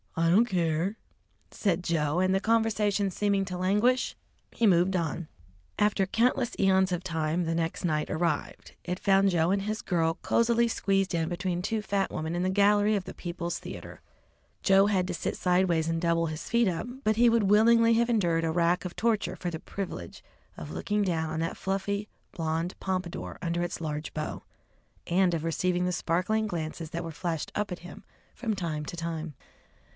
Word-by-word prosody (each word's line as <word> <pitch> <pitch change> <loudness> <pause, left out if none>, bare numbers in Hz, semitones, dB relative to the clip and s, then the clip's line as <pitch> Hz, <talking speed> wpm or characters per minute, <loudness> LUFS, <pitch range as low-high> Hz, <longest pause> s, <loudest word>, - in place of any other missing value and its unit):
"I 165 0 +3
don't 205 +7 +5
care," 175 0 0 0.5
said 180 -4 0
Joe, 160 -1 0
and 185 0 +2
the 190 - +3
conversation 210 -2 +1
seeming 200 0 +1
to 185 -1 -5
lauguish, 210 +8 +2 0.4
he 235 - 0
moved 185 0 +3
on. 170 -1 -2 0.5
After 205 -2 +2
countless 240 +4 +1
eons 190 -1 +3
of 180 0 -2
time 165 -1 -1
the 165 0 -1
next 165 +1 -2
night 155 -2 0
arrived. 160 -2 -2
It 180 +1 -3
found 195 0 +4
Joe 170 -1 +2
and 195 0 +1
his 215 +1 -3
girl 165 -2 +1
cosily 235 0 +2
squeezed 195 -4 0
in 165 -1 0
between 175 0 -2
two 220 +3 -1
fat 195 -1 0
women 160 +2 -3
in 175 - -1
the 185 - +1
gallery 205 +2 +4
of 195 -3 -2
the - - -7
People's 170 -1 -4
Theatre. - - -9 0.6
Joe 195 +1 +5
had 190 -3 +1
to 180 - -3
sit - - -3
sideways 180 -3 +2
and 165 0 -1
double 170 -1 +2
his 155 0 -5
feet 235 -1 +3
up, 175 +4 -2 0.2
but 215 0 +2
he 235 +2 +5
would 230 -1 +3
willingly 230 +3 +5
have 235 +1 +2
endured 175 -8 +2
a 165 - +1
rack 170 +2 +1
of 180 - -5
torture 225 -2 0
for 175 - -4
the 160 - -5
privilege 175 - -6 0.3
of 75 0 -7
looking 205 - -1
down 165 -4 -1
on 160 0 -3
that 165 +1 -2
fluffy, 200 +2 -2 0.2
blond 165 +2 -2
pompadour 185 -2 -3
under 170 0 -1
its 175 - -3
large 150 -1 -4
bow, 155 -1 -4 0.7
and 180 0 +3
of 160 - -3
receiving 180 +2 0
the 180 - 0
sparkling 185 +6 0
glances 160 -2 -4
that 170 +2 -4
were 165 - -5
flashed 165 0 -3
up 210 -1 -2
at 180 - -4
him 175 - -11 0.3
from 225 -4 -2
time 165 -5 -3
to 175 - -7
time. 165 -2 -4
180 Hz, 190 wpm, -28 LUFS, 165-205 Hz, 0.7 s, don't